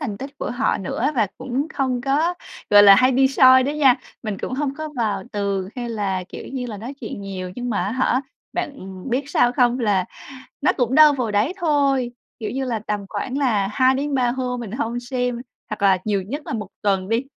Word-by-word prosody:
thành 230 -9 -4
tích 275 +1 -8
của - - -3
họ 245 +3 0
nữa, 230 +8 -1
và 225 -5 +2
cũng 260 +3 -2
không 260 -3 0
có, 290 +7 +1 0.4
gọi 205 0 +8
là, 200 -1 +9
hay 255 +5 +4
đi 265 +1 +4
soi 260 -1 +6
đó 280 - -1
nha, 285 -4 +5 0.3
mình 215 -4 -4
cũng - - -5
hông 275 0 -2
có 310 +1 -5
vào 210 -5 -1
tường 200 -2 -2
hay 240 -1 -4
là, 195 -5 -2
kiểu - - -9
như 255 -2 -3
là, 220 -3 -6
nói 235 +7 -7
chuyện 220 -4 -6
nhiều 185 -2 -6
nhưng 245 0 -3
mà 205 - 0
á 200 - -2
hả, 255 0 +1 0.3
bạn - - -2 0.4
biết 270 +4 -1
sao 245 - +3
không? 245 0 +2
Là 205 -5 +2 0.6
nó 295 - +4
cũng 250 -1 +1
đâu 305 -1 +8
vào 245 -6 -2
đấy 215 - +1
thôi, 280 -7 +1 0.3
kiểu 215 -3 -4
như 265 +1 -2
là, 235 -3 -2
tầm 205 -1 -2
khoảng 250 +6 -3
là 220 -8 +1
2-3 260 +1 +2
hôm 250 -1 -3
mình 230 -5 -6
hông 240 -1 -2
xem 245 -1 -2 0.3
hoặc 215 - -5
là 195 -2 +5
nhiều 205 -2 +1
nhất 255 +11 -5
là - - -4
1 210 -4 -4
tuần 195 -2 0
đi. 230 +3 +1
245 Hz, 220 wpm, -22 LUFS, 210-265 Hz, 0.6 s, là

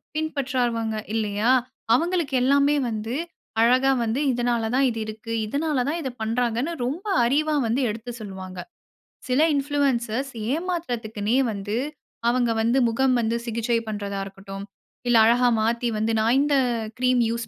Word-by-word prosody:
பின்பற்றவங்க 255 -7 -1 0.2
இல்லயா? 215 +2 +1 0.4
அவங்களுக்கு 335 -2 0
எல்லாமே 280 +2 +4
வந்து, 220 +3 -3 0.5
அழகா 255 +3 +4
வந்து 230 +4 -1
இதனால 240 -2 0
தான் 270 0 +4
இது 225 -1 -4
இருக்கு. 220 +1 -7
இதனால 285 +2 0
தான் 335 +2 -1
இத 265 - -3
பண்ணுறாங்கனு 240 +6 0
ரொம்ப 325 - -4 0.2
அறிவா 300 +4 +2
வந்து 245 +5 +1
எடுத்து 225 +3 -5
சொல்லுவாங்க. 190 -2 -8 0.7
சில 255 +4 +3
இன்ஃப்ளூயன்சர்ஸ் 270 -3 0 0.2
ஏமாத்துறதுக்குனே 245 - -2 0.2
வந்து, 205 +3 -3 0.5
அவங்க 240 -1 +2
வந்து 235 +4 +2
முகம் 255 +2 +2
வந்து 225 +1 0
சிகிச்சை 230 0 0
பண்றதா 200 -2 -4
இருக்கட்டும். 195 0 -8 0.4
இல்ல 240 -1 +5
அழகா 245 +2 +4
மாத்தி 235 +2 0
வந்து 220 +1 0
நான் 230 +4 +3
இந்த 290 -1 +2 0.4
கிரீம் 250 -1 +3
யூசு 235 0 -3
240 Hz, 135 wpm, -24 LUFS, 220-270 Hz, 0.7 s, இல்ல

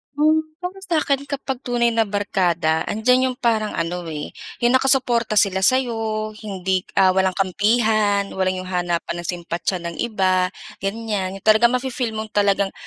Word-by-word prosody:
Hmm. 310 +2 +4 0.2
Para 365 +2 -6
sa 350 -4 -1
akin 280 -1 -1
kapag 270 -2 -4
tunay 240 -2 +1
na 225 - +2
barkada 180 -6 0
andiyan 250 +4 +2
'yong 250 - -10
parang 220 -4 0
ano, 170 +2 -2
eh, 150 -1 -6 0.3
'yong 240 +1 +2
nakasuporta 250 -4 +2
sila 190 -1 +3
sa'yo, 220 -2 +1
hindi 190 -3 -1 0.2
ah, 190 -1 +5
walang 190 -1 +1
kampihan, 205 +1 +2
walang 185 -1 0
'yong 185 - -6
hanapan 175 -1 -2
ng 175 - -8
simpatiya 175 +1 -3
ng 170 -1 -6
iba, 185 -5 +1 0.3
ganyan 195 -2 -3
'yong 195 - -18
talagang 220 +2 +6
mafi-feel 250 -2 -2
mong 220 0 -6
talagang 200 -1 +2
210 Hz, 160 wpm, -21 LUFS, 185-240 Hz, 0.3 s, talagang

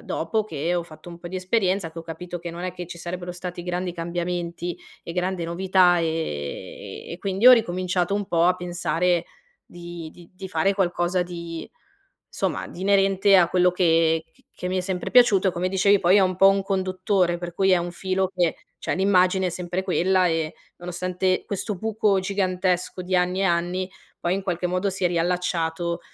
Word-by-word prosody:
dopo 220 -1 -1
che 165 -2 -2
ho 175 - 0
fatto 165 +1 -13
un 170 0 -10
po' 175 - -8
di 185 - -5
esperienza, 185 -3 0
che 165 - -8
ho - - -10
capito 175 +2 -7
che 170 - -6
non 170 +1 -7
è 185 - -3
che 180 -1 -7
ci 175 -1 -8
sarebbero 175 +1 -5
stati 180 0 -6
grandi 180 0 -3
cambiamenti 175 0 -3 0.3
e 170 - -6
grande 180 -1 -1
novità, 180 +1 +3
ehm, 165 - 0 1.1
e - - -5
quindi 200 +4 +1
ho 255 - +12
ricominciato 185 -4 +1
un 205 -1 -2
po' 170 -1 +2
a 180 +1 +4
pensare 175 -1 0 0.4
di 175 -2 -9
di 170 0 -16
di 190 0 -8
fare 195 +4 +1
qualcosa 180 -1 +1
di, 170 -2 -7 0.6
somma - - -2
di 180 - -11
inerente 195 0 +4
a 175 -2 +5
quello 180 0 +3
che 165 -2 +2
c 265 - -27
che 180 - -4
mi 185 - -1
è - - +1
sempre 180 -1 -3
piaciuto 215 -6 +5
e - - -1
come 180 +1 -1
dicevi 195 +1 +4
poi 180 +3 +5
è - - +6
un 185 -1 +1
po' 195 +1 +7
un 195 0 +3
conduttore, 185 -2 0
per 175 0 -6
cui 195 0 +2
è 185 - +6
un 175 0 -2
filo 190 +1 -1
che, 175 -3 +1 0.2
cioè, - - -2
l'immagine 190 -1 +3
è - - +1
sempre 180 +1 -3
quella 185 0 +2
e 165 -1 -1 0.2
nonostante 180 +1 -1
questo 200 +1 -3
buco 215 0 +1
gigantesco 185 -2 -1
di 185 0 0
anni 180 +1 +1
e - - +2
anni, 180 +1 0 0.3
poi 175 +2 0
in 195 - -3
qualche 180 -1 -2
modo 185 +2 0
si 190 0 -6
è - - +5
riallacciato, 170 -1 -1
180 Hz, 195 wpm, -24 LUFS, 175-190 Hz, 1.1 s, ho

